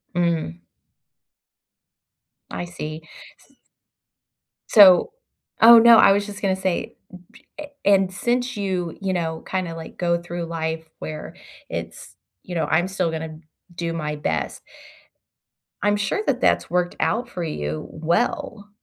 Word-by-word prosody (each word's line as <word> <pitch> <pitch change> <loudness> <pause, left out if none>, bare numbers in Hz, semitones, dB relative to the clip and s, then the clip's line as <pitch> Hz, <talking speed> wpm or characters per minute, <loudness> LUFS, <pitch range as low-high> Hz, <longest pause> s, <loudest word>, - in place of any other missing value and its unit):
Mm. 165 - -1 1.9
I 175 - -4
see. 155 -2 -7 0.5
S - - -28 1.1
So 195 - +7 0.5
Oh, 235 +1 +10
no. 235 0 +8
I - - +7
was 200 +1 0
just 205 0 -9
gonna 190 -2 +1
say 190 -2 -3 0.4
b - - -19
p 300 - -6
eh - - -9 0.2
and 195 -2 +3
since 245 +4 -1
you, 185 -4 -3
you 190 -1 -1
know, 160 -2 -3
kinda, 185 -3 -3
like, 165 -1 -10
go 170 -1 0
through 175 0 -5
life 160 -1 -3 0.2
where 155 -1 -7 0.3
it's - - -7 0.3
you 180 - -8
know, 160 -2 0
"I'm 165 +3 +2
still 185 -3 -1
gonna 160 -1 -6 0.4
do 170 -1 -3
my 150 -2 -3
best" 80 - -3 1.2
I'm 205 0 +2
sure 205 - -1
that - - 0
that's - - +2
worked 175 0 0
out 240 +1 0
for 180 -6 -5
you 75 - -4
well. 200 +5 -2
175 Hz, 140 wpm, -22 LUFS, 160-200 Hz, 1.9 s, Oh